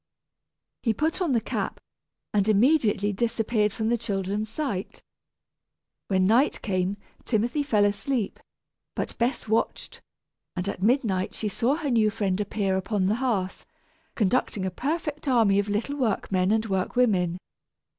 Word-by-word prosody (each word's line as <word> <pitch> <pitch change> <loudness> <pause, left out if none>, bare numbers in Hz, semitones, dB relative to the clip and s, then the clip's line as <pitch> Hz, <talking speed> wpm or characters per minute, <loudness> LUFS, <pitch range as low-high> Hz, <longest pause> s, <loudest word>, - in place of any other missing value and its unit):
He 225 -3 +1
put 320 +5 0
on 335 -7 +1
the 235 - +4
cap - - -3 0.5
and 205 0 +2
immediately 215 -3 +3
disappeared 225 0 +1
from 220 +1 -2
the 240 0 +1
children's 205 -1 -2
sight. 225 -7 -4 1.0
When 190 -1 +2
night 235 +9 +3
came, 190 -1 0 0.3
Timothy 240 +6 0
fell 220 -8 +3
asleep, 210 +2 -1 0.6
but - - -3
Bess 240 0 0
watched; 220 +1 -1 0.5
and 180 +1 -3
at 200 - -4
midnight 210 -5 +1
she 215 - -2
saw 240 +7 +1
her 300 -4 -2
new 220 -3 +4
friend 200 -2 -1
appear 200 -2 0
upon 190 0 0
the 205 +3 +2
hearth, 200 -8 -1 0.5
conducting 210 -2 +1
a 190 - -1
perfect 300 - -3
army 225 -6 +4
of 205 +1 -1
little 220 +8 -1
workmen 195 -6 0
and 220 0 +2
workwomen. 190 -2 +1
215 Hz, 140 wpm, -26 LUFS, 195-245 Hz, 1.0 s, the